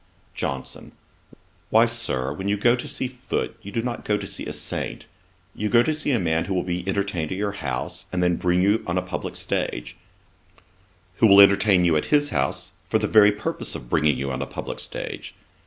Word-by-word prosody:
JOHNSON. 65 Hz, -1 st, -5 dB, 0.8 s
'Why, 115 Hz, +2 st, +6 dB
Sir, 115 Hz, -, -2 dB
when 95 Hz, +6 st, -4 dB
you 105 Hz, -, +1 dB
go 120 Hz, +4 st, +4 dB
to 125 Hz, +4 st, -5 dB
see 140 Hz, -2 st, -2 dB
Foote, 125 Hz, 0 st, -4 dB
you 100 Hz, -, -9 dB
do 115 Hz, +2 st, -1 dB
not 120 Hz, -1 st, -4 dB
go 105 Hz, -, +1 dB
to 100 Hz, -, -6 dB
see -, -, -6 dB
a -, -, -3 dB
saint: -, -, -5 dB, 0.5 s
you 105 Hz, -, -2 dB
go 120 Hz, +1 st, +5 dB
to 155 Hz, -, 0 dB
see 155 Hz, -1 st, -1 dB
a 125 Hz, -, +3 dB
man 80 Hz, -4 st, 0 dB
who 95 Hz, -, -2 dB
will 90 Hz, -, +1 dB
be 90 Hz, -1 st, -3 dB
entertained 95 Hz, -5 st, -1 dB
at 95 Hz, -, -2 dB
your 100 Hz, 0 st, -1 dB
house, 100 Hz, -, -4 dB
and 90 Hz, -1 st, 0 dB
then 90 Hz, -1 st, +3 dB
bring 90 Hz, +1 st, +1 dB
you 105 Hz, +3 st, +2 dB
on 90 Hz, +1 st, -1 dB
a 90 Hz, -, 0 dB
publick 90 Hz, 0 st, -5 dB
stage; -, -, -3 dB, 1.2 s
who 115 Hz, -, +5 dB
will 100 Hz, -1 st, +8 dB
entertain 100 Hz, -2 st, +6 dB
you 85 Hz, -2 st, +3 dB
at 75 Hz, -, -1 dB
his 145 Hz, -1 st, +2 dB
house, 65 Hz, +1 st, -1 dB, 0.2 s
for -, -, +2 dB
the -, -, -1 dB
very 105 Hz, -2 st, +6 dB
purpose 105 Hz, +1 st, -4 dB
of -, -, -9 dB
bringing 75 Hz, -4 st, +3 dB
you 70 Hz, 0 st, -3 dB
on 65 Hz, -, -3 dB
a -, -, -3 dB
publick -, -, -6 dB
stage. -, -, -6 dB
100 Hz, 215 wpm, -24 LUFS, 85-115 Hz, 1.2 s, will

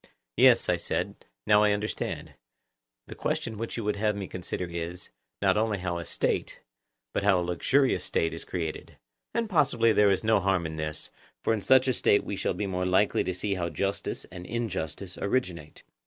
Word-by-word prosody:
Yes, -, -, +6 dB
I -, -, +2 dB
said, -, -, -3 dB, 0.2 s
now 105 Hz, 0 st, +5 dB
I 105 Hz, -1 st, +4 dB
understand: 105 Hz, +1 st, -3 dB, 0.7 s
the -, -, -9 dB
question 110 Hz, -3 st, -3 dB
which 115 Hz, +1 st, -4 dB
you 115 Hz, -, -3 dB
would 105 Hz, 0 st, -1 dB
have 105 Hz, 0 st, +1 dB
me 100 Hz, -2 st, -4 dB
consider 90 Hz, 0 st, -4 dB
is, 85 Hz, +1 st, -6 dB, 0.3 s
not -, -, +4 dB
only 110 Hz, -1 st, +1 dB
how 90 Hz, -2 st, -3 dB
a 85 Hz, -, -6 dB
State, -, -, -1 dB, 0.5 s
but -, -, 0 dB
how 100 Hz, -2 st, +4 dB
a 90 Hz, -, -1 dB
luxurious 130 Hz, -, +2 dB
State 80 Hz, -, 0 dB
is 80 Hz, -, -6 dB
created; 85 Hz, -4 st, -5 dB, 0.4 s
and 230 Hz, -1 st, +1 dB
possibly 130 Hz, -, +3 dB
there 105 Hz, -1 st, +5 dB
is 95 Hz, +1 st, +1 dB
no 110 Hz, -1 st, +4 dB
harm 95 Hz, -2 st, +1 dB
in 80 Hz, 0 st, -5 dB
this, 75 Hz, -1 st, -5 dB, 0.3 s
for -, -, +2 dB
in 110 Hz, -, -1 dB
such 130 Hz, +4 st, +5 dB
a 130 Hz, -, +3 dB
State 100 Hz, -, +3 dB
we 100 Hz, -, -4 dB
shall 95 Hz, -, -1 dB
be 105 Hz, -, -2 dB
more 90 Hz, -1 st, -1 dB
likely 95 Hz, +3 st, +3 dB
to 95 Hz, -, -2 dB
see 100 Hz, +2 st, -1 dB
how 85 Hz, -3 st, -2 dB
justice 95 Hz, +5 st, -3 dB
and 90 Hz, 0 st, -8 dB
injustice 95 Hz, -6 st, -4 dB
originate. 90 Hz, -10 st, -2 dB
100 Hz, 195 wpm, -28 LUFS, 90-110 Hz, 0.7 s, Yes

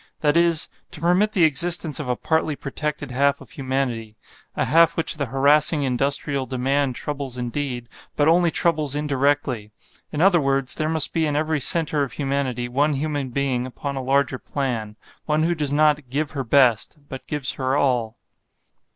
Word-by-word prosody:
That 150 Hz, 0 st, +2 dB
is, 170 Hz, -2 st, +3 dB, 0.2 s
to 175 Hz, -, -10 dB
permit 180 Hz, +6 st, +2 dB
the 185 Hz, -, +3 dB
existence 160 Hz, 0 st, +1 dB
of 140 Hz, -4 st, -5 dB
a 125 Hz, -, +1 dB
partly 160 Hz, +2 st, 0 dB
protected 145 Hz, 0 st, -4 dB
half 140 Hz, +2 st, +1 dB
of -, -, -13 dB
humanity; 130 Hz, -5 st, -3 dB, 0.4 s
a -, -, 0 dB
half 165 Hz, +1 st, +4 dB
which 165 Hz, -, -1 dB
the 140 Hz, -3 st, -2 dB
harassing 145 Hz, +4 st, +3 dB
industrial 135 Hz, +1 st, 0 dB
demand 135 Hz, +1 st, 0 dB
troubles 140 Hz, -3 st, -4 dB
indeed, 125 Hz, 0 st, -4 dB, 0.3 s
but 145 Hz, -, +2 dB
only 170 Hz, +1 st, +4 dB
troubles 155 Hz, -4 st, +1 dB
indirectly. 140 Hz, -6 st, 0 dB, 0.4 s
In 150 Hz, -, -4 dB
other 180 Hz, -1 st, +4 dB
words, 135 Hz, -1 st, 0 dB
there 155 Hz, 0 st, -2 dB
must 160 Hz, -2 st, +2 dB
be 160 Hz, -2 st, +1 dB
in 145 Hz, -, -2 dB
every 155 Hz, +1 st, 0 dB
center 155 Hz, +1 st, +2 dB
of 140 Hz, -, -2 dB
humanity 135 Hz, -4 st, -2 dB
one 145 Hz, +5 st, +1 dB
human 145 Hz, -1 st, -2 dB
being 130 Hz, -1 st, -1 dB
upon 140 Hz, +2 st, -6 dB
a 135 Hz, -, -3 dB
larger 135 Hz, 0 st, +1 dB
plan; 115 Hz, -7 st, -4 dB, 0.3 s
one 155 Hz, 0 st, +1 dB
who 170 Hz, +2 st, +2 dB
does 150 Hz, -4 st, -2 dB
not 150 Hz, -2 st, +2 dB
"give 145 Hz, +3 st, -2 dB
her 140 Hz, -3 st, -3 dB
best," 125 Hz, +1 st, +3 dB
but 135 Hz, -2 st, -9 dB
gives 145 Hz, -4 st, 0 dB
her 130 Hz, 0 st, -1 dB
all. 120 Hz, -5 st, 0 dB
140 Hz, 175 wpm, -22 LUFS, 130-155 Hz, 0.4 s, half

